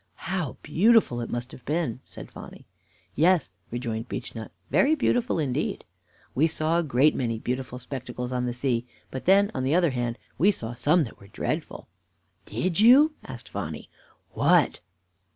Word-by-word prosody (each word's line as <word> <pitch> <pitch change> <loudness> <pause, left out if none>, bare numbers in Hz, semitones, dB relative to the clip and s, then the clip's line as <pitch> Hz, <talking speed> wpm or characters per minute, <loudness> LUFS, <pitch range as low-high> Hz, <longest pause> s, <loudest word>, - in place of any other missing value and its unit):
"How 175 -5 -2
beautiful 210 - +3
it 115 - -5
must 120 +1 -4
have 125 - -12
been!" 150 -5 -1
said - - -10
Phonny. - - -11 0.5
"Yes," 170 +1 +3 0.2
rejoined 115 -2 -4
Beechnut, 110 -1 -6 0.2
"very 300 +4 +4
beautiful 245 - +1
indeed. 140 -6 -2 0.5
We 155 +5 +3
saw 160 +1 +1
a - - +1
great 140 +1 +3
many 115 -3 -1
beautiful 125 +2 -4
spectacles 125 -1 -6
on 125 -1 -1
the 120 - -2
sea; 125 -1 -1 0.2
but 130 - -6
then, 200 +2 +5
on 130 - -2
the 135 +5 +2
other 175 -4 +3
hand, 120 -2 -2 0.2
we 190 - +5
saw 120 - -2
some 150 +8 +3
that 115 - -9
were 100 - -15
dreadful. 100 - -4 0.6
"Did 185 0 -1
you?" 270 +8 +7
asked 125 -3 -9
Phonny. - - -6 0.4
"What?" - - +3
130 Hz, 160 wpm, -26 LUFS, 120-175 Hz, 0.6 s, you